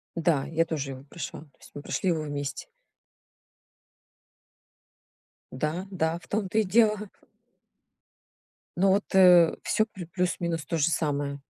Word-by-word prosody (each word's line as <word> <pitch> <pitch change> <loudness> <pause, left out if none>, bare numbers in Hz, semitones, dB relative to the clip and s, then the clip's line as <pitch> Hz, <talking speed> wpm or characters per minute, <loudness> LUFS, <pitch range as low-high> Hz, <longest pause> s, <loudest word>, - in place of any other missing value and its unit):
Да, 160 -4 +1
я 165 +1 0
тоже 145 -4 -3
его 130 0 -9
прошла, 145 -1 -7
то 145 -4 -20
есть - - -16
мы 145 - -7
прошли 185 - -2
его 165 -3 0
вместе. 145 - -5 2.9
Да, 160 +5 -3
да, 165 -3 0
в - - -19
том-то 210 0 -1
и - - +3
дело. 215 0 +2 1.7
Но 195 +2 +4
вот, 200 +2 +2
э, 180 -3 +7
всё 215 - +1
плю 190 -5 -10
плюс 180 +2 -1
минус 165 -3 -2
тоже 165 -1 +1
самое. 145 -3 -1
165 Hz, 135 wpm, -27 LUFS, 150-190 Hz, 2.9 s, э